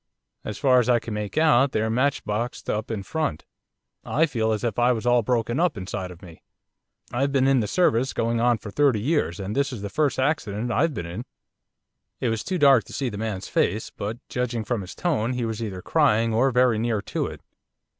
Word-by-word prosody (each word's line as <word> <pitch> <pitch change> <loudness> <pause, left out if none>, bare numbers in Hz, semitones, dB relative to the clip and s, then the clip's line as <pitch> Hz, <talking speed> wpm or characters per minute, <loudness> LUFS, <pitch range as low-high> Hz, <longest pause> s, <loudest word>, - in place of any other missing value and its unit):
As 105 - -5
far 130 -3 +4
as 125 0 0
I 120 - +5
can 115 -1 -5
make 105 +4 -4
out 140 -4 +4
they're 110 +1 +1
matchboxed 120 -3 -1
up 105 +1 -3
in 110 -4 -3
front. 155 - -3 0.6
I 155 +4 +2
feel 115 -7 -1
as 110 +1 -2
if 120 -2 -1
I 120 +1 +4
was 115 0 -4
all 120 0 +4
broken 120 +3 0
up 170 -8 +1
inside 95 -1 -5
of 90 +2 -13
me. 85 -3 -13 0.7
I've 135 +3 0
been 135 -1 +2
in 135 -1 +4
the 105 - -1
service 130 - +2
going 115 0 0
on 120 -1 +3
for 105 - -9
thirty 140 -3 +3
years, 120 - 0
and 100 +2 -4
this 140 0 +1
is 115 -6 -6
the 100 - -3
first 150 -2 +1
accident 125 -5 -1
I've 160 +3 +1
been 85 - -4
in.' 90 +9 -6 0.9
It 125 - 0
was 110 -1 -2
too 185 - -2
dark 140 -6 +6
to - - -12
see 135 -3 -1
the 105 -2 -7
man's 105 -4 -3
face, 105 +5 0
but 105 +3 -5
judging 125 -2 -2
from 115 0 -2
his 95 - -9
tone 130 -9 0
he 125 -1 -2
was 115 0 -4
either 95 -5 -5
crying 115 -8 +2
or 125 +5 +3
very 125 -3 +3
near 115 -2 -1
to - - -2
it. - - -9
120 Hz, 220 wpm, -24 LUFS, 105-135 Hz, 0.9 s, dark